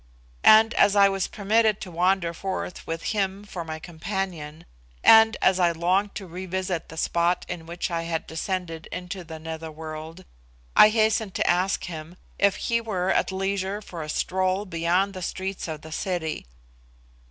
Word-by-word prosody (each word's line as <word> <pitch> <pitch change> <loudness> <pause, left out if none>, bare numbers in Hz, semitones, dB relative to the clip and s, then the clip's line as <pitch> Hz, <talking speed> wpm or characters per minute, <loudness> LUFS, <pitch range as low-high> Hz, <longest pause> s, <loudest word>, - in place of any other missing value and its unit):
And 220 +1 +7
as 205 - +4
I 200 -1 +6
was 195 -1 -1
permitted 215 +1 +2
to 185 - -7
wander 175 0 +1
forth 185 0 -5
with 165 0 -4
him 195 -1 -1
for 185 -4 -6
my 160 -1 -5
companion, 170 -2 -5 0.4
and 220 0 +7
as 190 0 +4
I 175 -1 +4
longed 185 +5 +1
to 195 - -5
revisit 185 0 -4
the 160 - -10
spot 170 +2 +1
in 170 -2 -6
which 175 +1 -4
I 165 -1 -1
had 165 -1 -3
descended 165 -1 -4
into 180 +1 -6
the 160 -1 -8
nether 160 0 -6
world, 160 +3 -8 0.5
I 210 - +9
hastened 220 -2 +1
to - - 0
ask 180 +3 +1
him 165 0 -7 0.2
if 200 -1 +4
he 230 0 0
were 190 -5 -1
at - - +1
leisure 195 +1 -2
for 180 -5 -8
a 155 - -6
stroll 185 +4 0
beyond 180 +2 0
the 185 - -7
streets 190 +2 -4
of 155 -2 -5
the 160 - -10
city. 160 - -3
185 Hz, 170 wpm, -25 LUFS, 165-195 Hz, 0.5 s, I